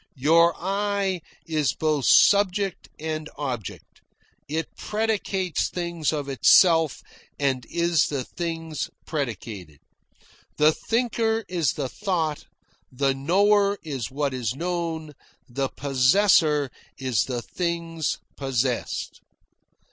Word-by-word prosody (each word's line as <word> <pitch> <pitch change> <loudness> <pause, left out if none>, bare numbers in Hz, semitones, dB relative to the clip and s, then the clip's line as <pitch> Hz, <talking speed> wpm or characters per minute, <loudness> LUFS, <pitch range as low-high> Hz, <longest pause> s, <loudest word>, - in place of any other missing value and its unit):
Your 165 +5 +4
I 195 0 -1 0.2
is 155 -4 0
both 155 -4 0
subject 200 -1 +4
and 155 0 -4
object; 125 -8 -6 0.5
it 160 +2 -4
predicates 205 -5 -1
things 170 -3 -2
of 145 -3 -3
itself 160 +2 +4 0.3
and 135 -3 -1
is 170 -2 +2
the 140 -3 -2
things 165 0 -4 0.2
predicated. 110 - -5 0.8
The 150 +1 +6
thinker 225 +2 0
is 170 -7 0
the 140 -3 -3
thought, 160 - -2 0.5
the 135 +1 +1
knower 200 +8 +3
is 135 -9 -4
what 140 0 -2
is 125 -2 -2
known, 165 -2 -3 0.3
the 135 +2 -2
possessor 145 +1 +3 0.3
is 130 -5 0
the 120 -3 -4
things 170 -3 -2 0.2
possessed. 130 -3 -2
155 Hz, 100 wpm, -25 LUFS, 135-180 Hz, 0.8 s, The